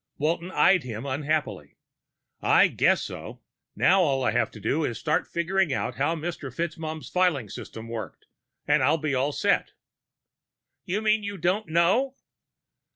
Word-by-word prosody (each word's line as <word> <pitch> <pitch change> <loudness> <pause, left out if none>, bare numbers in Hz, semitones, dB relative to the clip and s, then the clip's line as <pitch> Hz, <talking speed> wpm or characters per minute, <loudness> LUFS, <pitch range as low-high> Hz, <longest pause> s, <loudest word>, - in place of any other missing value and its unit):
Walton 165 +4 -1
eyed 185 -1 +4
him 120 -1 -6
unhappily. 140 - -2 0.6
"I - - +5
guess - - +2
so. - - -8 0.3
Now 190 +1 +4
all 135 -6 +1
I - - +2
have - - +1
to 110 - -12
do 140 +10 0
is 120 -6 -2
start 150 +5 0
figuring 170 0 0
out 125 -1 -2
how 145 +5 +1
Mr. 160 -4 -5
FitzMaugham's 160 +1 -4
filing 175 - +1
system 110 +3 -8
worked, 110 -7 -7 0.4
and 150 0 +3
I'll 145 +5 +3
be 155 -2 -2
all 135 +3 +1
set." - - 0 1.1
"You 205 +5 -2
mean 215 0 +3
you 200 -1 -5
don't 185 +4 0
know?" 190 +12 +2
155 Hz, 155 wpm, -26 LUFS, 130-180 Hz, 1.1 s, I